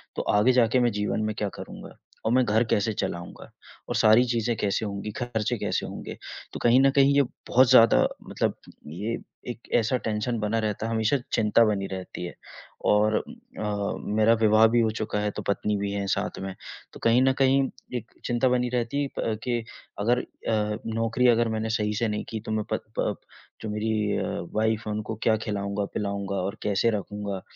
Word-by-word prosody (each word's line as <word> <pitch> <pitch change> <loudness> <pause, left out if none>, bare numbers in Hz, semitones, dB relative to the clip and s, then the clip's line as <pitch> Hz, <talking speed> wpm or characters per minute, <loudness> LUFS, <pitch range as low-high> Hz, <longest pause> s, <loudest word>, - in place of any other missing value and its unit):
तो - - -1 0.2
आगे 120 +5 +5
जाके 125 0 +4
मैं 120 -1 +3
जीवन 105 +1 -1
में 110 -1 -2
क्या 105 -1 -1
करूँगा - - -9 0.3
और 110 - +2
मैं 130 0 +5
घर 110 +3 +3
कैसे 105 +2 +2
चलाऊँगा? 85 -3 -5 0.4
और - - -1
सारी 110 +1 +6
चीज़ें 120 -1 0
कैसे 105 +1 0
होंगी, 100 +1 -4
खर्चे 120 0 -2
कैसे 100 -3 -1
होंगे? - - -7 0.4
तो - - -5
कहीं 120 +2 +6
न 135 - +6
कहीं 140 0 +5
ये 140 - +6 0.3
बहुत 130 0 +5
ज़्यादा 115 -3 +6 0.2
मतलब - - 0 0.3
ये 105 +9 -3 0.4
एक 120 - -10
ऐसा 120 +2 +2
टेंशन 110 +1 -2
बना 110 +2 0
रहता 110 0 -2
है, - - -3
हमेशा 110 +5 +2 0.2
चिंता 110 +1 +4
बनी 100 -2 0
रहती 95 -1 -6
है। 85 - -6 0.6
और 105 +1 +3
उम, - - -5 0.3
अ, 105 -1 -1 0.2
मेरा 110 +1 +5
विवाह 110 +1 +6
भी 120 +1 +2
हो 110 -1 +2
चुका 110 -1 -2
है 105 0 -1
तो - - -6
पत्नी 105 +1 0
भी 100 0 -2
हैं 100 -1 -2
साथ - - -1
में 95 0 -4 0.4
तो - - -11
कहीं 115 +2 +5
न 135 0 +4
कहीं 135 0 +4 0.4
एक 115 - -9
चिंता 120 +2 +2
बनी 125 0 +1
रहती 125 +3 -1
है 140 - -1
प 110 -2 -1
के 120 -2 0 0.4
अगर 120 +4 +2
अ, 105 -1 -2 0.2
नौकरी 115 +2 +2
अगर 120 0 +3
मैंने 110 0 -2
सही 105 -1 0
से 115 +2 0
नहीं 105 0 -2
की 110 - -4
तो - - -2
मैं 110 -1 0
प - - 0 0.2
प - - 0 0.5
जो 110 - -4
मेरी 105 0 0
अ, - - -1 0.3
वाइफ 110 0 +1
है 105 - -1
उनको 110 +1 -4
क्या 110 -1 +4
खिलाऊँगा, 100 -2 -2
पिलाऊँगा 100 -1 -2
और 100 +3 -2
कैसे 105 +3 +2
रखूँगा। 100 -2 -4
110 Hz, 200 wpm, -26 LUFS, 105-120 Hz, 0.6 s, सारी